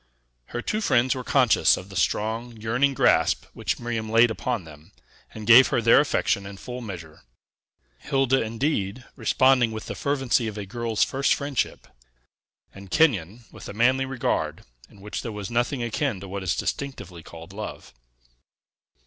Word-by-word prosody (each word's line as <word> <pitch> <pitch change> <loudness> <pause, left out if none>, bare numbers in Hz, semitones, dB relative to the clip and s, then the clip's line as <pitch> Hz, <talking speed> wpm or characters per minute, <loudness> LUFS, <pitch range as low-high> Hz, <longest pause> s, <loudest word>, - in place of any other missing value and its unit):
Her 120 - -6
two 215 - -1
friends 125 - +2
were 130 - -5
conscious 125 -3 +4
of 90 - -9
the 100 - -11
strong, 110 +6 -1
yearning 120 +6 +1
grasp - - +3
which - - -2
Miriam 115 -2 -3
laid 115 +1 +5
upon 120 -2 -3
them, 80 +3 -15 0.4
and 110 -1 -9
gave 120 +4 +8
her - - +1
their 115 0 +6
affection 140 -8 +1
in 100 0 -9
full 125 +4 -7
measure; 85 -8 -9 0.8
Hilda, 135 -1 +1
indeed, 115 -1 -2
responding 130 -3 +3
with 110 -1 -6
the - - -5
fervency 135 -4 0
of 110 -1 -6
a 105 - -5
girl's 115 +1 -1
first 135 +1 +1
friendship, 140 -3 -3 0.9
and 100 0 -12
Kenyon 115 - +1
with - - -11
a - - -6
manly 130 +5 +2
regard, 130 -3 -2 0.3
in 100 - -18
which 105 +2 -5
there 115 - -5
was 105 0 -6
nothing 120 +2 0
akin 120 -1 -2
to 100 - -9
what 100 +1 -5
is 90 -2 -1
distinctively 130 - -5
called 85 +3 -12
love. 105 +1 -8
115 Hz, 165 wpm, -25 LUFS, 100-130 Hz, 0.9 s, gave